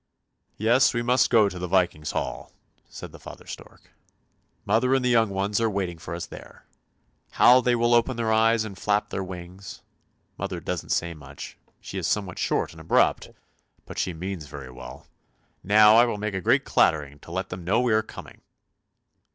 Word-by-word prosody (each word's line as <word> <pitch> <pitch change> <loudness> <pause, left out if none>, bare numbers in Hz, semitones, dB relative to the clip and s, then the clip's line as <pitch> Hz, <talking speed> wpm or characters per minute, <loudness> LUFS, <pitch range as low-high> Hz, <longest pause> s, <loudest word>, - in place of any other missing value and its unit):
" - - -48
Yes, 120 +5 +3
we 120 - 0
must 125 +2 +3
go 110 -4 +5
to 90 -2 -6
the 90 - -4
Viking's 85 -4 0
hall," - - -4 0.4
said - - -9
the - - -13
father - - -12
stork; - - -12 0.4
" - - -44
mother 115 +6 +2
and 130 -1 0
the 125 - +2
young 115 -2 +3
ones 100 +2 -1
are 115 - +2
waiting 95 -5 -3
for 85 -1 -6
us 85 - -5
there. - - -13 0.7
How 125 +1 +6
they 125 0 +2
will 120 0 +2
open 120 +1 +2
their 115 -1 0
eyes 110 0 +3
and 100 -3 -8
flap 105 +2 -1
their 95 - -3
wings! 90 0 -9 0.6
Mother - - -4
doesn't - - -5
say 85 0 -1
much; 75 -4 -10 0.2
she 95 - -6
is 85 - -2
somewhat 95 -3 -2
short - - 0
and - - -13
abrupt, - - +2 0.6
but - - -7
she 90 - -1
means 85 -1 -6
very 70 -3 -9
well. 65 0 -11 0.6
Now 105 +2 +6
I 120 - +7
will 115 -3 -2
make 105 0 -3
a 95 - -3
great - - +2
clattering 75 -2 +1
to 85 - -13
let 95 +2 -3
them 90 -1 -7
know 100 +7 +1
we 125 -2 +1
are 110 - +3
coming! 110 - -12
100 Hz, 195 wpm, -25 LUFS, 90-115 Hz, 0.7 s, I